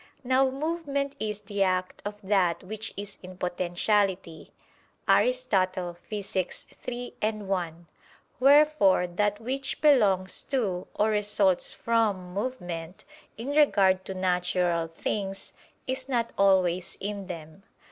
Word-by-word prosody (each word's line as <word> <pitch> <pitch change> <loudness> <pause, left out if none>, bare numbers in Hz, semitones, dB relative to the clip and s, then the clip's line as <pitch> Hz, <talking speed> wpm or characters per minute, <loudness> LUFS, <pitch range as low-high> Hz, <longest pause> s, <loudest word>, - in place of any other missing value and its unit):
Now 260 +1 +3
movement 280 -1 -2
is 210 -1 -3
"the 205 -2 -4
act 185 -1 0
of 205 0 -5
that 190 -4 +2
which 215 +3 -5
is 200 0 -7
in 185 0 -11
potentiality" 180 0 0 0.6
(Aristotle, 185 - +2 0.2
Phys. 200 -3 -3 0.2
iii, 245 0 -4 0.3
1). 175 -3 -3 0.5
Wherefore 280 -9 +5
that 205 +4 0
which 265 +3 -3
belongs 205 -11 +3
to, 205 -10 -1
or 210 +1 +2
results 205 -3 +2
from, 210 -6 0
movement, 180 -6 -5 0.3
in 235 +5 -5
regard 200 -11 +4
to 190 - -5
natural 180 -2 +1
things, 195 +4 -4 0.3
is 260 +1 -3
not 235 -3 0
always 185 -2 +2
in 200 -1 -4
them. 160 -1 -8
200 Hz, 115 wpm, -27 LUFS, 185-240 Hz, 0.6 s, Wherefore